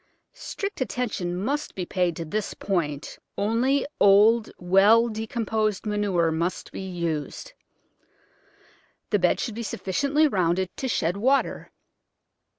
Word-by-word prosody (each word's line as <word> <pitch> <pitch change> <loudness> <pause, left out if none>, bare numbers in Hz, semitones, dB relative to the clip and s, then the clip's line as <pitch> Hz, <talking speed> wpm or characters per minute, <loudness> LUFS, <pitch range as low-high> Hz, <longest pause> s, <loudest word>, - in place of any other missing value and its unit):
Strict 400 -7 -6
attention 210 -7 -2
must 280 +10 -2
be 185 - -3
paid 175 -2 0
to 165 - -5
this 210 +6 -3
point— 150 -7 -3 0.2
only 240 +7 +1
old, 215 +3 +5
well 200 +6 +5
decomposed 220 -1 -2
manure 200 -6 +1
must 170 +3 -2
be - - -6
used. 170 -5 -4 1.6
The 205 - +3
bed 180 -1 +2
should 230 - -3
be 230 - -5
sufficiently 280 - +1
rounded 185 - 0
to 265 - -3
shed 180 -6 0
water. 265 +6 +1
205 Hz, 120 wpm, -25 LUFS, 180-230 Hz, 1.6 s, old